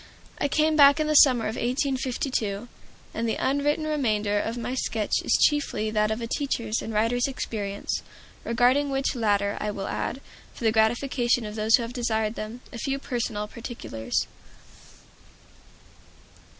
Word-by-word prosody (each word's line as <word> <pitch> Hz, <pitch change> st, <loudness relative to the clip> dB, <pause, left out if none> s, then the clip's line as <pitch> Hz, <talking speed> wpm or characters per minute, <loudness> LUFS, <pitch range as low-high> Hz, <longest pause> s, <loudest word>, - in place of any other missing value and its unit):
I -, -, +1 dB
came 310 Hz, +2 st, +2 dB
back 285 Hz, 0 st, +7 dB
in 310 Hz, -, +1 dB
the 305 Hz, -, +1 dB
summer 255 Hz, -5 st, +6 dB
of 220 Hz, -, -2 dB
1852, 255 Hz, -4 st, -1 dB, 0.5 s
and 230 Hz, 0 st, -1 dB
the -, -, 0 dB
unwritten 290 Hz, +3 st, 0 dB
remainder 215 Hz, -9 st, 0 dB
of 225 Hz, +3 st, -3 dB
my 240 Hz, +1 st, -3 dB
sketch 225 Hz, -4 st, -1 dB
is -, -, +3 dB
chiefly 285 Hz, -7 st, +1 dB
that 215 Hz, -1 st, +2 dB
of 220 Hz, +2 st, -2 dB
a -, -, -2 dB
teacher's 230 Hz, -4 st, -2 dB
and 225 Hz, -, -5 dB
writer's 230 Hz, +4 st, +1 dB
experience; 205 Hz, -6 st, -3 dB, 0.4 s
regarding 250 Hz, +5 st, +2 dB
which 270 Hz, 0 st, 0 dB
latter 205 Hz, -4 st, +1 dB
I 210 Hz, -, -1 dB
will 200 Hz, -2 st, -4 dB
add, 265 Hz, -, -3 dB, 0.4 s
for -, -, -9 dB
the 220 Hz, -, +4 dB
gratification 240 Hz, +2 st, +1 dB
of 210 Hz, -, -6 dB
those 220 Hz, +1 st, +4 dB
who 245 Hz, -, -1 dB
have 230 Hz, +1 st, -6 dB
desired 220 Hz, -3 st, 0 dB
them, 225 Hz, +2 st, -7 dB
a 235 Hz, -, -6 dB
few 275 Hz, +2 st, -1 dB
personal 235 Hz, -6 st, -3 dB
particulars. 225 Hz, -, -4 dB
235 Hz, 155 wpm, -26 LUFS, 215-270 Hz, 0.5 s, back